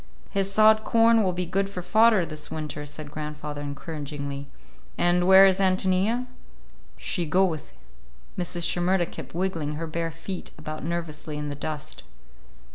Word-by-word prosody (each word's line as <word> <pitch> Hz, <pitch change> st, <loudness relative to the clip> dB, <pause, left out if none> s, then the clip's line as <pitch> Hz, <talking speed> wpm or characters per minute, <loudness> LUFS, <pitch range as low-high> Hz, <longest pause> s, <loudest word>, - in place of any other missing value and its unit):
"His 195 Hz, -1 st, 0 dB
sod 215 Hz, +1 st, +5 dB
corn 230 Hz, 0 st, +4 dB
will 190 Hz, -3 st, +2 dB
be 180 Hz, 0 st, -2 dB
good 195 Hz, +3 st, -1 dB
for 180 Hz, -3 st, -6 dB
fodder 220 Hz, -2 st, +4 dB
this 155 Hz, -2 st, -5 dB
winter," 150 Hz, -1 st, -5 dB
said 145 Hz, 0 st, -8 dB
grandfather 150 Hz, -1 st, -5 dB
encouragingly. 145 Hz, -1 st, -5 dB, 0.5 s
"And 175 Hz, +1 st, +3 dB
where 190 Hz, +1 st, +9 dB
is 190 Hz, 0 st, +3 dB
Ántonia?" 190 Hz, +5 st, +2 dB, 0.7 s
"She 175 Hz, -5 st, -1 dB
go 185 Hz, +5 st, +4 dB
with." 160 Hz, -6 st, -4 dB, 0.6 s
Mrs. 175 Hz, -1 st, -3 dB
Shimerda 175 Hz, 0 st, +2 dB
kept -, -, -9 dB
wiggling 170 Hz, -5 st, -1 dB
her 160 Hz, +2 st, -4 dB
bare 165 Hz, +1 st, -2 dB
feet 165 Hz, +4 st, -6 dB
about 155 Hz, -1 st, -6 dB
nervously 160 Hz, -2 st, -4 dB
in 150 Hz, 0 st, -4 dB
the 145 Hz, -, -4 dB
dust. 155 Hz, 0 st, -5 dB
170 Hz, 150 wpm, -26 LUFS, 150-190 Hz, 0.7 s, where